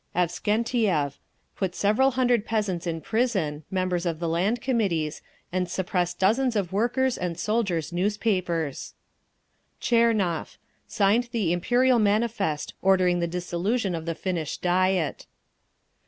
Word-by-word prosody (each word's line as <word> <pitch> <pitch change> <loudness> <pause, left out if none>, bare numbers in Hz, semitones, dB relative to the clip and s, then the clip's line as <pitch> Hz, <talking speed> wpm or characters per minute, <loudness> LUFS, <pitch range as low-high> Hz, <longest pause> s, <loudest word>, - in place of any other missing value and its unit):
Avksentiev: 180 - 0 0.4
put 185 -2 -2
several 215 +7 +3
hundred 245 -4 +3
peasants 205 -6 -2
in 165 -1 -3
prison, 190 -11 -1
members 185 -2 -1
of 165 -2 -1
the 170 - -2
Land 185 +9 +1
Committees, 190 - -1 0.3
and 180 0 -1
suppressed 180 -1 -1
dozens 230 +6 +2
of 190 -3 -1
workers' 245 +5 +1
and 175 -2 -3
soldiers' 185 -5 -1
newspapers. 180 - -1 0.8
Tchernov: 225 -8 +1 0.3
signed 220 +4 +2
the 200 -8 0
"Imperial" 245 +7 +3
manifest, 205 -7 0
ordering 185 -2 +3
the 170 - 0
dissolution 180 +4 -1
of 165 -1 -5
the 165 - -1
Finnish 170 -3 -3
Diet. 180 -3 0
190 Hz, 120 wpm, -26 LUFS, 175-225 Hz, 0.8 s, several